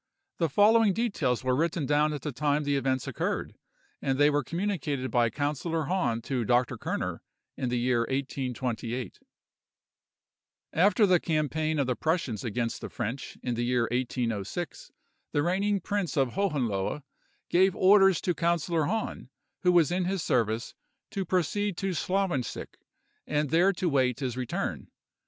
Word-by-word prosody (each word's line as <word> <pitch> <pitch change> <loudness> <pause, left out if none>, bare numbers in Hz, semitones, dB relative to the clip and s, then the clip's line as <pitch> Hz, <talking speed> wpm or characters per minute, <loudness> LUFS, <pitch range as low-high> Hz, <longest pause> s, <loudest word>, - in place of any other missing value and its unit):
The 165 -2 +2
following 210 +5 +5
details 165 - 0
were 130 0 +2
written 160 +1 0
down 150 +2 +2
at 145 -3 -5
the 150 - -2
time 145 +2 0
the 145 0 0
events 130 -1 0
occurred, - - -2 0.5
and 135 -1 0
they 145 +1 +5
were 145 -1 +1
communicated 160 - -2
by 120 -1 +3
Councillor 150 +5 -2
Hahn 130 -9 0
to 125 -2 -1
Dr. 120 +2 +2
Kerner - - -3 0.3
in 130 - -2
the 125 - 0
year 120 -1 +1
1828:— 125 -4 -3 1.5
"After 205 +6 +4
the 185 -2 +4
campaign 155 0 0
of 140 - +2
the 125 -1 0
Prussians 155 - -1
against 115 0 -2
the - - -6
French, 120 +3 -5
in 125 - -1
the 120 - -2
year 120 0 +2
1806, 120 - -3 0.4
the 145 - +2
reigning 195 +4 +1
prince 195 -5 -2
of 135 -2 +3
Hohenlohe 140 - -1 0.5
gave 185 +1 +4
orders 195 -2 +6
to 180 - 0
Councillor 170 -2 +1
Hahn, 220 +7 -3 0.3
who 180 - +3
was 175 -2 +4
in 180 0 0
his 190 -2 -1
service, 115 -2 0 0.4
to 195 -1 -2
proceed 185 +2 0
to 195 -1 -1
Slawensick, 180 -7 -2 0.5
and 150 -2 0
there 175 +4 +5
to 180 0 -2
wait 130 -5 +2
his 130 -4 -2
return. 125 -2 -3
150 Hz, 150 wpm, -28 LUFS, 125-180 Hz, 1.5 s, orders